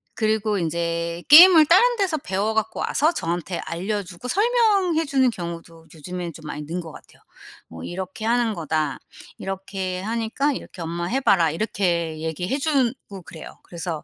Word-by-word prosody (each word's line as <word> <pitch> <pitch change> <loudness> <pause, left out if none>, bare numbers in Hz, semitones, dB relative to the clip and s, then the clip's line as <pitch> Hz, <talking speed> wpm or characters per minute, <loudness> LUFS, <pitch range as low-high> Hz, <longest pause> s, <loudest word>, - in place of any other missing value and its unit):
그리고 215 -2 0
인제 170 0 -2
게임을 320 0 +9
다른 480 +8 +5
데서 375 -7 0
배워 210 -1 -2
갖고 220 0 -1
와서 310 +4 +1
저한테 175 - -3
알려 200 +5 -3
주고 185 +6 -10
설명해 400 - +2
주는 265 -2 +2
경우도 165 -3 -8
요즘에는 175 +1 -6
좀 155 - -13
많이 150 0 -6
는 175 +4 -4
것 165 - -10
같아요. - - -16 0.5
뭐 80 0 -10
"이렇게 190 +4 -6
하는 230 -2 +1
거다. 155 -3 -2 0.4
이렇게 190 -1 -5
하니까 230 +7 -1
이렇게 185 -8 -9
엄마 170 +1 -4
해 260 +9 -1
봐라." 170 - +3
이렇게 170 -3 -1
얘기해 170 - -3
주고 265 - -1
그래요. 160 - -11
그래서 170 -2 -6
190 Hz, 345 characters per minute, -23 LUFS, 170-260 Hz, 0.5 s, 게임을